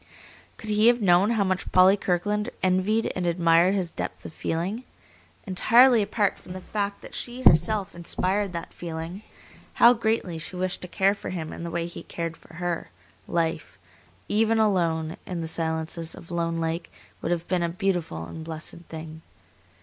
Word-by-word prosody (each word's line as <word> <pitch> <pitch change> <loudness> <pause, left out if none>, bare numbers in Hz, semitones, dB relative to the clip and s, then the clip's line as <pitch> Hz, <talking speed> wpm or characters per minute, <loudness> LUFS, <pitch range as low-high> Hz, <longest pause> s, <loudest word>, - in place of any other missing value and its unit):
Could 215 - -5
he 210 +2 +4
have 240 0 +5
known 190 0 +4
how 225 -3 +2
much 185 -1 -2
Polly 185 +2 +7
Kirkland 205 +4 -1
envied 190 +4 +2
and 180 -1 -1
admired 170 +2 +4
his 180 -4 -1
depth - - -5
of - - -8
feeling, 185 +12 -2 0.6
entirely 230 +5 +5
apart 205 0 0
from 180 - -10
the 185 - -6
fact 200 +2 -3
that - - -11
she 245 +1 -4
herself 195 +3 +4
inspired 185 +3 -1
that 170 -1 -6
feeling, 170 +3 -6 0.5
how 240 +1 +8
greatly 220 -7 -1
she 160 +4 -8
wished 185 0 -2
to 180 - -5
care 195 +2 +2
for 200 - -7
him 165 -4 -4
in - - -7
the 170 - -4
way 170 0 -2
he 170 - -8
cared 165 -1 -5
for 165 - -17
her, 175 -1 -3 0.4
life, 160 - -1 0.5
even 225 +2 +2
alone 170 -7 +1
in 175 -2 -3
the 165 - -3
silences 160 0 -2
of 170 - -13
Lone 170 -1 -1
Lake, 165 +1 -3 0.3
would 165 - -2
have 170 -1 -1
been 180 -2 +1
a 170 - 0
beautiful 170 - -2
and 160 - -8
blessed 160 0 -6
thing. 160 0 -8
180 Hz, 175 wpm, -26 LUFS, 165-205 Hz, 0.6 s, how